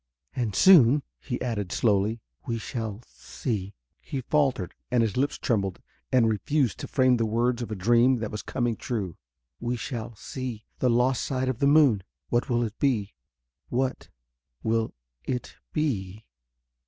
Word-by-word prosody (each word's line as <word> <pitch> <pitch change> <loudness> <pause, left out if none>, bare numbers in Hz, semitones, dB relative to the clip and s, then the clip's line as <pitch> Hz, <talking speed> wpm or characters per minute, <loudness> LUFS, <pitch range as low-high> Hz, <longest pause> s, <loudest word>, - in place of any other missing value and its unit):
"And 115 -6 -1
soon," 145 - +7 0.2
he 125 -3 -4
added 105 -7 -2
slowly, 110 +1 +1 0.3
"we 115 -2 -1
shall 110 -1 -5
see...." 100 -6 -5 0.3
He 135 - -4
faltered 130 - +1 0.2
and 120 -2 +3
his 110 -3 -1
lips 140 +3 0
trembled 100 -7 0 0.3
and 125 -3 +5
refused 120 +3 +1
to - - -5
frame 130 -3 +3
the 115 - +1
words 120 +2 +1
of 120 - -4
a 110 - -3
dream 120 +6 +4
that 110 -2 -4
was 105 - -4
coming 120 -2 -1
true. 105 -7 -3 0.4
"We 120 +1 -1
shall 120 -1 -5
see... 125 0 -6
the 125 - +3
lost 125 +1 +2
side 130 -1 -1
of 130 -2 -2
the 140 - +3
moon. 140 -8 +5 0.3
What 120 0 +1
will 120 -1 +2
it 115 -1 -5
be... 110 -8 +1 0.6
what 130 +1 -1 0.5
will 115 0 0 0.3
it 125 -1 -4
be...?" 110 -9 -2
120 Hz, 155 wpm, -27 LUFS, 110-130 Hz, 0.6 s, soon